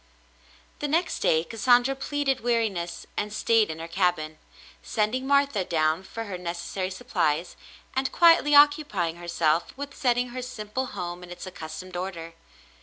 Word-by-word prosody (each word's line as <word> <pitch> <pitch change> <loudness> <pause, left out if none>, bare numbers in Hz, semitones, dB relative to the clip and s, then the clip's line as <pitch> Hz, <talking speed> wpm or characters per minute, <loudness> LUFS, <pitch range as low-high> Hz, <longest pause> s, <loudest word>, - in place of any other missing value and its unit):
The 295 - -2
next 330 +4 0
day 160 0 +3
Cassandra 245 +6 +3
pleaded 275 -1 -1
weariness 220 -8 -1
and 210 0 -2
stayed 220 0 +2
in 160 - -4
her 165 +1 -6
cabin, 170 -3 0 0.4
sending 235 +5 -1
Martha 280 -7 +3
down 160 -1 +1
for 225 +4 -7
her 195 -4 -6
necessary 175 +2 -4
supplies, 180 -6 -1 0.4
and 265 0 0
quietly 330 -3 +5
occupying 285 - +4
herself 170 +1 0
with 285 0 -6
setting 245 -1 +1
her 255 +1 -5
simple 250 0 -4
home 175 -1 -4
in 180 - -11
its 180 - -8
accustomed 180 0 -8
order. 175 -2 -5
205 Hz, 145 wpm, -26 LUFS, 175-255 Hz, 0.4 s, quietly